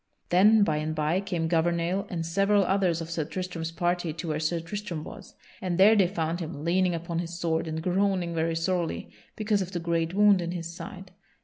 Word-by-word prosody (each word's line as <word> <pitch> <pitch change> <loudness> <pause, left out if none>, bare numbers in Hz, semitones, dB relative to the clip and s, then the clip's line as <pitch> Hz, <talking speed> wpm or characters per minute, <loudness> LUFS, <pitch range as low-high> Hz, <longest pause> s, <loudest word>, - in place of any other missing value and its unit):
Then 205 +4 +6
by 155 -6 +1
and 155 +1 -2
by 155 +4 +1
came 175 -5 -2
Gouvernail 170 +4 0
and 165 -2 -3
several 195 +4 +3
others 185 -3 +1
of 165 0 -6
Sir 165 -1 -1
Tristram's 165 0 -4
party 175 -1 -1
to 170 +1 -5
where 155 0 -1
Sir 160 +2 0
Tristram 170 -2 -5
was; - - -11 0.3
and 180 -2 -1
there 205 +4 +7
they 195 -4 +4
found 170 -2 -2
him 155 -3 -6
leaning 180 +1 +2
upon 170 0 -3
his 170 0 -5
sword 160 -1 0
and 160 0 -4
groaning 185 -1 +1
very 165 0 0
sorely 170 0 -2 0.2
because 215 -2 0
of 190 +1 -5
the 175 - -1
great 165 +1 -1
wound 205 -2 +5
in 170 0 -3
his 170 -1 -5
side. 185 +1 -9
175 Hz, 205 wpm, -27 LUFS, 165-190 Hz, 0.3 s, there